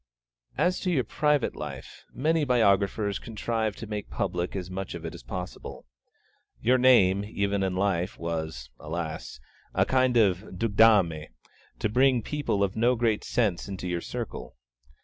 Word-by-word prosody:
As 180 +1 +2
to 185 - -2
your 145 -8 +2
private 150 +3 +1
life, - - -8
many 160 +3 +1
biographers 100 -5 +2
contrive 110 -1 -2
to 115 - -7
make 105 -1 -5
public 90 +2 -2
as 90 -2 -4
much 95 0 -5
of 85 -1 -7
it 80 - -5
as - - -10
possible. 90 +9 -7 0.7
Your 125 +2 +3
name, 100 -7 +5
even 100 -1 -1
in 95 -1 0
life, 95 -2 0
was, 80 -7 -4
alas! 80 -5 -5 0.4
a - - +3
kind 130 -2 +2
of 95 -6 +4 0.2
ducdame 100 -7 +4 0.5
to - - 0
bring 125 +2 +3
people 145 -9 -1
of 100 -1 -1
no 120 +3 +3
very - - -7
great 115 -2 +1
sense 105 -8 0
into 95 -2 -5
your 85 -1 -2
circle. - - -6
100 Hz, 155 wpm, -27 LUFS, 90-120 Hz, 0.7 s, name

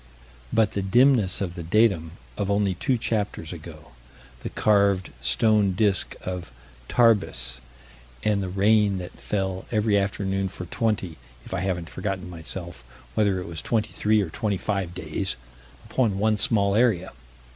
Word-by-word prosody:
But 110 -2 +3
the 100 - -2
dimness 115 0 +3
of 90 -3 -2
the 90 - -6
datum 85 -3 +2 0.2
of 100 -1 -2
only 100 -1 +2
two 125 +8 0
chapters 105 -7 -2
ago. 80 -4 -11 0.5
The - - -4
carved 100 -3 +2
stone 100 - +3
disk 100 0 +1
of 90 -1 -4 0.4
Tarbes, 70 - +2 0.6
and 105 -2 +2
the 95 - -3
rain 100 +1 +3
that 90 -1 -6
fell 95 -2 -2
every 105 -2 +2
afternoon 95 -1 -1
for 90 -1 -7
twenty 100 -3 -1 0.3
if - - -8
I 95 - 0
haven't 90 -2 -2
forgotten, 95 -2 -4
myself, 85 -2 -7 0.3
whether 100 -3 +2
it 90 - -6
was 85 -1 -5
twenty 110 -2 -1
three 105 0 +2
or 80 - -6
twenty 105 +1 -1
five 95 -3 -2
days! 95 +1 -3 0.5
upon 110 -7 +1
one 110 +2 +2
small 100 -2 +2
area. 110 -5 +2
100 Hz, 150 wpm, -25 LUFS, 90-105 Hz, 0.6 s, But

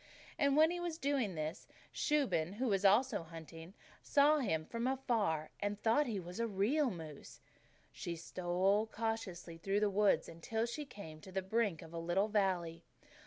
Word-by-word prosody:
And 280 +1 +4
he 350 - -3
was 345 -2 -3
doing 270 - 0
this 155 +5 -4
when - - -25 0.2
Shuben, 245 - +1
who 245 +4 -1
was 195 -1 +1
also 220 +5 +4
out 165 - -10
hunting, 165 +2 -10 0.3
saw 295 +1 +4
him 160 - 0
from 230 +5 -2
afar 225 - 0
and 205 0 -2
thought 235 +8 +3
he 215 -4 -2
was 180 +3 -8
a 230 - +1
real 230 +8 +2
moose. 160 -7 -9 0.5
She 170 - -5
stole 185 +5 +1
cautiously 210 -7 -4
through 195 +4 0
the 210 -1 +2
woods 205 +1 +3
until 220 +8 -2
she 290 +5 -4
came 160 - -10
to 190 - -11
the 190 0 -2
brink 200 -4 0
of 165 0 -12
a 170 - -3
little 175 +5 +1
valley. 180 -5 0
200 Hz, 175 wpm, -36 LUFS, 170-235 Hz, 0.5 s, And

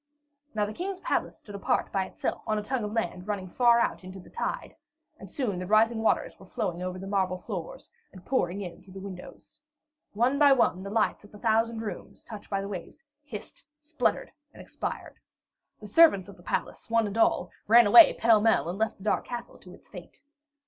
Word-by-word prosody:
Now 210 -1 +1
the 210 - -6
King's 375 - -4
palace - - -2
stood 205 - -13
apart 200 - -1
by 195 -1 0
itself - - -4
on 215 - +1
a 210 - -3
tongue 250 +1 -2
of 210 - -4
land 185 -4 -3
running 200 -3 -3
far 235 +5 +4
out 235 - -1
into 185 +1 -9
the 180 - -15
tide, 465 - -4 0.4
and - - -11
soon 225 - -2
the 180 - -5
rising 220 +2 +3
waters 220 - +1
were 190 - -15
flowing 180 -2 -3
over 185 0 -4
the 190 - -8
marble 190 -2 0
floors - - -7 0.2
and 185 -2 -14
pouring 200 -7 0
in 180 -3 -8
through 185 0 -16
the 195 - -8
windows. 195 +9 -11 0.5
One 245 +6 +1
by 285 -2 +7
one, 230 -8 +2
the 195 - -6
lights 215 0 0
in 205 - -16
the 210 - -12
thousand 225 +1 +1
rooms, 210 - -8
touched 215 -3 -10
by 195 -1 -1
the 195 - -5
waves, 200 - -8 0.2
hissed, 240 -4 -9
sputtered, 305 +1 -1 0.2
and - - -16
expired. - - -6 0.6
The 215 - -11
servants 205 - +5
of 200 - -12
the 175 - -18
palace, 175 - -4
one 230 -1 +2
and 205 0 -5
all, 230 - +2 0.2
ran 235 +2 +7
away 330 +11 +9
pell 225 -2 +4
mell, 220 -6 +2
and 185 +4 -5
left 220 0 -1
the 190 - -14
dark 215 - 0
castle 240 -1 -7
to - - -13
its - - -22
fate. - - -12
210 Hz, 210 wpm, -28 LUFS, 190-235 Hz, 0.6 s, away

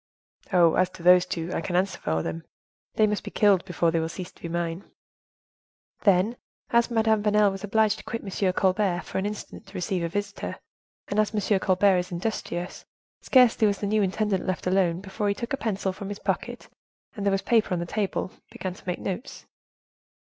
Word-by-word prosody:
"Oh, 175 -3 +5
as 185 0 +2
to 170 - -12
those 180 0 +6
two, 175 -1 -3
I - - -1
can 180 - -3
answer 185 +1 +1
for 80 0 -1
them; 80 0 -4 0.5
they 215 - +5
must 210 -1 -1
be - - -6
killed 200 -4 +3
before 175 -3 +1
they 165 - +1
will 160 0 -2
cease 180 +1 -7
to - - -24
be 170 - -5
mine." 170 +2 -2 1.2
"Then, 200 +4 +3 0.3
as 235 0 +3
Madame 220 -2 +2
Vanel 210 -1 +3
was 195 0 -7
obliged 215 0 +2
to - - -11
quit 230 - -5
M. 190 -2 0
Colbert 185 -1 +1
for - - -3
an 195 - -1
instant 210 0 -8
to 190 - -15
receive 185 0 -1
a 170 - -1
visitor, 200 +2 -4 0.5
and 205 - -1
as 215 0 +1
M. 205 -1 +2
Colbert 190 0 +3
is 180 - -5
industrious, 175 -1 -4 0.4
scarcely 245 -4 +5
was 200 -1 +1
the - - -4
new 215 +1 +2
intendant 195 0 0
left 185 - -2
alone, 180 -2 +2
before 200 +1 -3
he 200 - 0
took 235 +5 -5
a - - +1
pencil 195 -5 -2
from 195 +1 -7
his 205 - -5
pocket, - - -3 0.5
and, 205 - -5
there 200 - +2
was 195 0 0
paper 225 -1 +2
on 180 - +1
the 170 - -2
table, 195 0 -2 0.2
began 185 -1 -5
to 185 - -17
make 180 - -1
notes." 200 +8 -6
195 Hz, 210 wpm, -26 LUFS, 180-210 Hz, 1.2 s, those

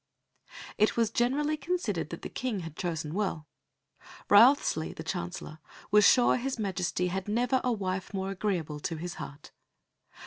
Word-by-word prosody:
It 215 +2 +3
was 230 -2 +2
generally 290 +6 +1
considered 355 +5 -2
that - - -8
the - - -3
King 240 -7 -3
had 165 -2 -8
chosen 160 -4 -3
well. 185 -6 -2 0.9
Wriothesley, 205 - +5
the 160 - -8
Chancellor, 175 -2 -5 0.3
was 210 0 +7
sure 245 -1 +5
His 260 +1 -3
Majesty 180 -3 -1
had 190 +2 -3
never 245 +4 +1
a 250 - +1
wife 190 -4 -3
more 195 -1 -3
agreeable 180 -7 -2
to 165 - -3
his 175 +2 -6
heart. 145 - -9
195 Hz, 150 wpm, -29 LUFS, 175-240 Hz, 0.9 s, was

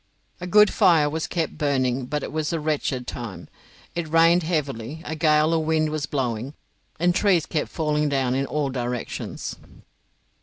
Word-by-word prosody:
A 180 - -5
good 210 +2 +5
fire 160 -5 +4
was 160 +1 -2
kept 165 -3 -3
burning 130 -3 0
but 150 +2 -2
it - - -5
was 155 -1 -2
a 165 - -1
wretched 150 -4 -1
time. 105 -9 -7 0.5
It 170 -1 -3
rained 165 +2 +5
heavily, 150 -3 -3
a - - -4
gale 155 +1 +3
of 165 - +2
wind 155 -1 +1
was 150 -3 -2
blowing, 130 0 -2 0.4
and 175 +1 +3
trees 185 -4 +3
kept 155 -3 -2
falling 150 -2 0
down 135 -3 0
in 135 +1 0
all 145 -1 -1
directions. 125 -1 -4
150 Hz, 165 wpm, -24 LUFS, 135-160 Hz, 0.5 s, good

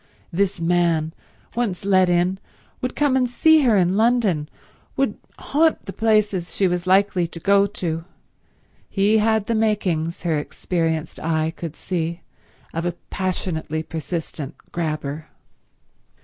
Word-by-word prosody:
This 190 0 0
man, 165 -2 +1 0.4
once 205 -7 -1
let 185 -2 +4
in, 180 +2 +2 0.4
would 255 - -3
come 290 -3 +2
and 250 -2 +2
see 315 +5 +5
her 235 -6 +4
in 180 0 +3
London, 215 -9 +2 0.5
would - - +1 0.2
haunt 315 +3 +1
the 195 - -6
places 210 -6 +1
she 195 - +3
was 180 0 -2
likely 190 -2 +3
to 165 - -9
go 200 +3 +4
to. 165 -5 -3 0.9
He 210 +2 +3
had 220 -1 +2
the 230 - 0
makings, 185 -8 0
her 160 -4 +1
experienced 160 0 -2
eye 160 0 0
could 160 -2 -6
see, 170 -1 -3 0.5
of 165 - -2
a 175 - -1 0.2
passionately 170 -4 -2
persistent 160 -2 -5 0.2
grabber. 155 -2 -3
180 Hz, 135 wpm, -22 LUFS, 165-210 Hz, 0.9 s, see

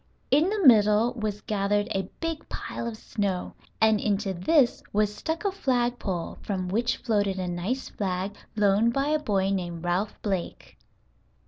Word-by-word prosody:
In 300 +7 +4
the 410 -4 0
middle 215 0 +6
was 215 -4 -3
gathered 205 0 0
a 195 -1 -2
big 330 -2 -4
pile 235 - -5
of 225 -2 -5
snow, 200 -4 -3 0.3
and 220 -1 +4
into 200 -2 0
this 245 - +3
was 210 0 +1
stuck 320 - -4
a 400 - +2
flag 245 -9 0
pole 180 -4 -4
from 185 -3 -3
which 230 +5 0
floated 205 -5 0
a 185 -1 -2
nice 180 +10 -3
flag 190 0 -3 0.2
loaned 210 +2 +3
by 275 +3 0
a 310 0 +2
boy 195 -8 0
named 175 -3 -3
Ralph 185 +4 -1
Blake. 190 -4 -3
210 Hz, 160 wpm, -27 LUFS, 195-245 Hz, 0.3 s, middle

